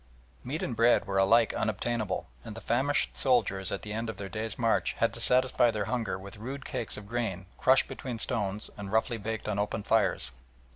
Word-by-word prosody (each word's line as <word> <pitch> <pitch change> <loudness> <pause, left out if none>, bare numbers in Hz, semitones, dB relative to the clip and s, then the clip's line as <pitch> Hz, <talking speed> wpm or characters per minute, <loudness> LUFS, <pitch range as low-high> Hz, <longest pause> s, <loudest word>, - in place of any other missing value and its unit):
Meat 140 +6 -4
and 120 - -3
bread 115 +2 +4
were 95 0 0
alike 115 +4 +4
unobtainable, 110 0 -2 0.2
and 105 - -8
the - - -7
famished 130 +7 +1
soldiers 105 -8 +2
at 100 - -4
the 105 - -5
end 115 +1 -3
of 110 - -6
their 100 -1 -6
day's 110 +1 -4
march 115 -2 +1
had - - 0
to - - -4
satisfy 125 -1 +4
their 105 -3 -2
hunger 115 -5 -2
with 100 +3 -10
rude 130 +6 -6
cakes 125 -5 -1
of 105 -1 -9
grain 105 -5 -3
crushed 130 +1 +5
between 125 -3 -6
stones 105 -2 -1
and 100 -1 -6
roughly 110 +1 +1
baked 110 +2 -4
on 105 -1 -1
open 105 0 -2
fires. 110 - +2
110 Hz, 200 wpm, -29 LUFS, 100-120 Hz, 0.2 s, crushed